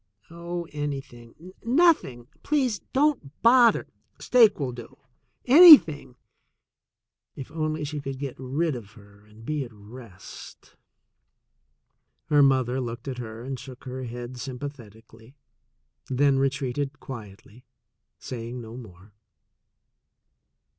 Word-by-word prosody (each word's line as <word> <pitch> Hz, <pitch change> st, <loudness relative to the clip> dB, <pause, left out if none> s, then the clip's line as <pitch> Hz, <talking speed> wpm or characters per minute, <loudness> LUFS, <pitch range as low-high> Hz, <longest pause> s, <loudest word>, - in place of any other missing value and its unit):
"Oh, 170 Hz, 0 st, -6 dB
anything 145 Hz, +2 st, -7 dB
— -, -, -34 dB
nothing 240 Hz, -, +2 dB
— -, -, -34 dB
please 260 Hz, -8 st, 0 dB
don't 265 Hz, -, 0 dB
bother 235 Hz, 0 st, +5 dB, 0.2 s
— -, -, -42 dB
steak 230 Hz, -7 st, +5 dB
will 135 Hz, -3 st, -2 dB
do 120 Hz, +2 st, -11 dB, 0.3 s
— 120 Hz, +1 st, -47 dB, 0.2 s
anything" 165 Hz, -, +8 dB, 0.6 s
— -, -, -65 dB
if 135 Hz, +2 st, -9 dB
only 155 Hz, -1 st, -3 dB
she 150 Hz, +1 st, -5 dB
could 135 Hz, -1 st, -6 dB
get 135 Hz, -2 st, -5 dB
rid 140 Hz, +4 st, -2 dB
of 105 Hz, -3 st, -10 dB
her 100 Hz, -2 st, -19 dB
and 110 Hz, +2 st, -17 dB
be 150 Hz, 0 st, -2 dB
at 120 Hz, -, -11 dB
rest! 105 Hz, -2 st, -13 dB, 1.5 s
Her 145 Hz, -2 st, +4 dB
mother 130 Hz, -2 st, +2 dB
looked 120 Hz, +1 st, -7 dB
at 130 Hz, -2 st, -5 dB
her 115 Hz, -1 st, -8 dB
and 130 Hz, 0 st, -6 dB
shook 130 Hz, -1 st, -12 dB
her 130 Hz, 0 st, -6 dB
head 120 Hz, +1 st, -8 dB
sym 130 Hz, 0 st, -6 dB
pathetically, 115 Hz, -3 st, -12 dB, 0.7 s
then 135 Hz, +1 st, +2 dB
retreated 135 Hz, +1 st, -2 dB
quietly, 110 Hz, -1 st, -11 dB, 0.5 s
saying 120 Hz, 0 st, -7 dB
no 115 Hz, -1 st, -10 dB
more. 100 Hz, -4 st, -13 dB
130 Hz, 125 wpm, -25 LUFS, 120-150 Hz, 1.5 s, anything